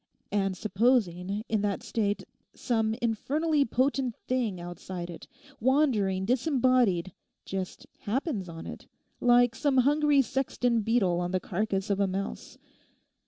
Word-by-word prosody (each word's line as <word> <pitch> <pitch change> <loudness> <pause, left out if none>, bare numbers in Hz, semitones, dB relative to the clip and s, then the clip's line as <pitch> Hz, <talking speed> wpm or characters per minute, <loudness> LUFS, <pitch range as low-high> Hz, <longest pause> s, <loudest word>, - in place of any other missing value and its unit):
And 195 -2 0
supposing 205 -3 +1
in 220 -2 0
that 200 -2 -1
state 205 -3 -1 0.3
some 225 -2 0
infernally 285 +6 +1
potent 255 0 0
thing 235 -8 0
outside 175 0 -6
it, 170 - -10 0.3
wandering 225 -8 +2
disembodied, 250 - +2 0.3
just 190 -1 -5
happens 220 - -2
on 165 0 -8
it—like 245 -1 +1
some 285 -3 +1
hungry 290 +1 +4
sexton 245 -2 0
beetle 205 -6 +2
on 175 0 -1
the 185 0 0
carcase 195 +2 -2
of 200 - 0
a 200 - +3
mouse. 195 +1 -5
220 Hz, 120 wpm, -28 LUFS, 190-255 Hz, 0.3 s, hungry